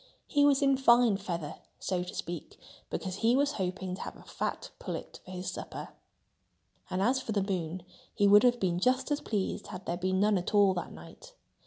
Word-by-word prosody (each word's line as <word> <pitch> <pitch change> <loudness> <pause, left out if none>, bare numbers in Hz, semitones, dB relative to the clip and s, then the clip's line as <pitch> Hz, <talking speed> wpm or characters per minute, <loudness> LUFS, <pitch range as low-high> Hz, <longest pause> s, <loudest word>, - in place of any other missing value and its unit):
He 290 -1 +3
was 280 0 +4
in 275 -1 +4
fine 240 -4 +5
feather, 170 -6 -4 0.2
so 185 -2 -1
to 180 - -6
speak, 175 +2 -6 0.3
because 190 -1 -4
he 230 +3 +3
was 285 +1 +3
hoping 185 -4 -3
to 185 - -6
have - - -6
a - - -15
fat - - -4
pullet - - -6
for - - -14
his 185 0 -4
supper. - - -7 1.0
And 185 +1 0
as 260 +4 +2
for 220 - -3
the 200 -2 +1
moon, 180 -3 -3 0.3
he 205 - +3
would 205 +1 +8
have 245 -1 +4
been 175 -3 0
just 255 +8 +1
as 290 - +1
pleased 205 -3 -2
had 185 -1 -8
there 170 - -2
been 185 +1 0
none 205 -1 +3
at 180 - -3
all 200 -2 +6
that 175 - -4
night. - - -13
195 Hz, 205 wpm, -30 LUFS, 185-245 Hz, 1.0 s, would